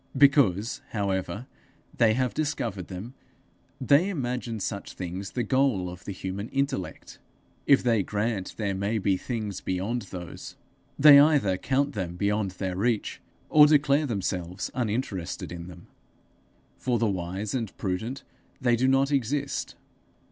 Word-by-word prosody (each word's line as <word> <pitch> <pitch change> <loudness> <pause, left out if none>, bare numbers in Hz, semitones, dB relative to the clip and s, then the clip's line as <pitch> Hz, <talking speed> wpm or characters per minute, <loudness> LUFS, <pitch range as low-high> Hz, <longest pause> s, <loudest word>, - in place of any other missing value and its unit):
Because, 130 - +4
however, 100 +2 -2 0.5
they 110 -3 +4
have 130 0 0
discovered 115 - -2
them, 100 +7 -7 0.7
they 140 +8 +4
imagine 125 - -3
such 100 0 -4
things 95 +2 -6
the 125 - -1
goal 115 -7 +1
of 90 0 -12
the - - -4
human 95 +3 -5
intellect. 135 - -3 0.5
If 140 - +5
they 115 -4 +3
grant 105 0 -2
there 100 -3 -1
may 100 +4 -1
be 100 -2 +1
things 110 -1 -4
beyond 100 +7 -2
those, 90 -2 -8 0.4
they 145 0 +9
either 140 -10 +4
count 135 +9 0
them 90 -4 -4
beyond 100 +1 0
their 95 -2 -2
reach, 110 +2 -1 0.3
or 150 -1 +7
declare 150 0 +3
themselves 95 -4 -3
uninterested 110 -9 -3
in 85 0 -7
them: 90 -1 -12 0.9
for 125 -2 0
the 115 - +1
wise 95 +1 -3
and 115 -6 -3
prudent, 110 +8 -3 0.4
they 120 -2 +3
do 125 +3 +1
not 135 +1 +3
exist. 140 +1 -1
110 Hz, 140 wpm, -27 LUFS, 95-130 Hz, 0.9 s, they